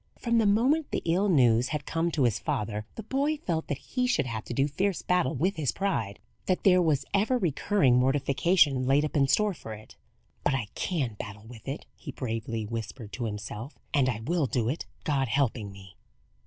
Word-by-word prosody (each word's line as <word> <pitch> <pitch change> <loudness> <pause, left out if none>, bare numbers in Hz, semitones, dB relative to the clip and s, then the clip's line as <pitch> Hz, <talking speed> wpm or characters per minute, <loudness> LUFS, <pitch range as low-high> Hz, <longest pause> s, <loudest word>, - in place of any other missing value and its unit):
From 235 -1 +1
the 220 - +3
moment 260 +10 +3
the - - -2
ill 185 +5 +2
news 125 -7 +4
had 150 -2 -3
come 165 +1 0
to 155 -4 0
his 120 -5 +2
father, 105 0 -3
the 220 - -6
boy 280 +7 0
felt 165 - -2
that 145 - -2
he 250 - -2
should 250 - +2
have 110 -3 -4
to - - -7
do 135 +3 +2
fierce 190 +6 -1
battle 180 -3 +1
with 180 +9 0
his 145 -5 0
pride; 115 - -2 0.3
that 185 - +1
there 185 -2 +6
was 155 -5 +1
ever 215 +6 +3
recurring 175 - +2
mortification 135 +1 +3
laid 140 +3 +4
up 150 - -5
in 140 -2 +4
store 210 +7 +2
for 115 -9 -8
it. 110 +1 -15 0.5
"But 145 - +2
I 115 -6 -3
can 145 - -1
battle 105 +1 -7
with 115 -1 -12
it," 135 +3 -4
he 145 - -8
bravely 115 -3 -3
whispered 110 0 -6
to 120 +1 -3
himself: 105 +5 -6 0.2
"and 135 -3 +3
I 115 -3 -3
will 160 +3 0
do 115 0 0
it, 150 - -3 0.2
God 135 -3 +1
helping 120 -6 0
me." 95 -1 -13
140 Hz, 205 wpm, -28 LUFS, 115-180 Hz, 0.5 s, there